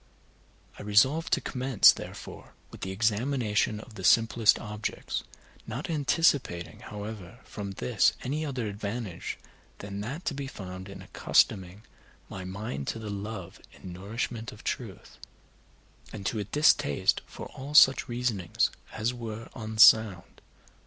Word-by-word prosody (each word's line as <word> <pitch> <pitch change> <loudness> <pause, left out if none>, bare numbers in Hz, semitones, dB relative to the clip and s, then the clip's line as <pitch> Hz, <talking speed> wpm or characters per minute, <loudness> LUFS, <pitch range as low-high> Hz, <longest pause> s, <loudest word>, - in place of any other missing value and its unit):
I - - -7
resolved 130 +10 +3
to - - +3
commence, 130 -4 +5
therefore, - - -9 0.2
with - - -12
the 95 - -3
examination 110 +1 0
of 110 +1 -12
the 95 - -9
simplest 115 +1 +5
objects, 105 0 -4 0.4
not 125 +9 -4
anticipating, 140 - +1
however, 105 -1 -8
from 100 -2 -6
this 65 -9 +2
any 150 +5 -2
other 130 -6 -3
advantage 100 -2 -5 0.4
than 100 0 -6
that 140 - -6
to - - 0
be 140 0 -5
found 95 -5 -8
in 95 -1 -9
accustoming 95 +1 +1 0.5
my 95 - -7
mind 95 -7 -5
to - - -2
the 110 -2 -6
love 100 -2 -6
and 90 - -9
nourishment 110 +5 -4
of 105 - -14
truth, 110 -7 -5 0.9
and 100 -3 -8
to 110 - -1
a 105 - -3
distaste 125 - +3
for - - -9
all 140 +3 -8
such 135 -3 +7
reasonings 120 -7 0 0.2
as 110 +3 -1
were 115 -2 -7
unsound. 110 -4 +4
110 Hz, 135 wpm, -28 LUFS, 100-125 Hz, 0.9 s, such